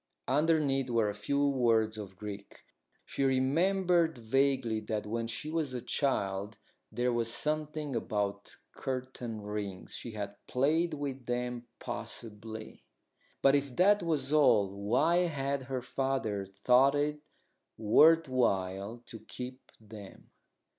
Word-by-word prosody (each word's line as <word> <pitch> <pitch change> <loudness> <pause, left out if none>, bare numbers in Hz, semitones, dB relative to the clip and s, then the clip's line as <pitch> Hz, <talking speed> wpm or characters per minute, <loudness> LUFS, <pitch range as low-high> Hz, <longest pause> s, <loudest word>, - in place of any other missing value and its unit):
Underneath 145 -4 +2
were 115 -3 +2
a - - -3
few 140 +8 0
words 115 -5 +2
of 100 -3 -8
Greek. 100 -1 -8 0.4
She - - -2
remembered 165 +5 +2
vaguely 125 -1 +1
that 105 -1 -3
when 115 +2 -2
she 150 +6 -5
was 155 -5 -1
a - - -2
child 100 -7 -1 0.3
there 125 0 0
was 115 -1 +1
something 150 +1 -1
about 100 -3 -3 0.2
curtain 125 -4 -4
rings 105 -2 -5
she 115 - -6
had 100 -1 -5
played 155 +6 +1
with 135 -3 -5
them, 120 0 -3
possibly. 110 0 -7 0.6
But 135 - +6
if 140 -3 0
that 205 +3 +5
was 150 -4 -1
all, 110 -10 +4
why 120 - +2
had 140 -3 -2
her 130 -2 -2
father 130 -7 -2
thought 125 +8 +4
it 150 +1 0 0.6
worth 160 +9 +5
while 100 -2 -1
to 115 - -9
keep 125 +4 -9
them? 105 -2 -12
125 Hz, 125 wpm, -31 LUFS, 110-140 Hz, 0.6 s, But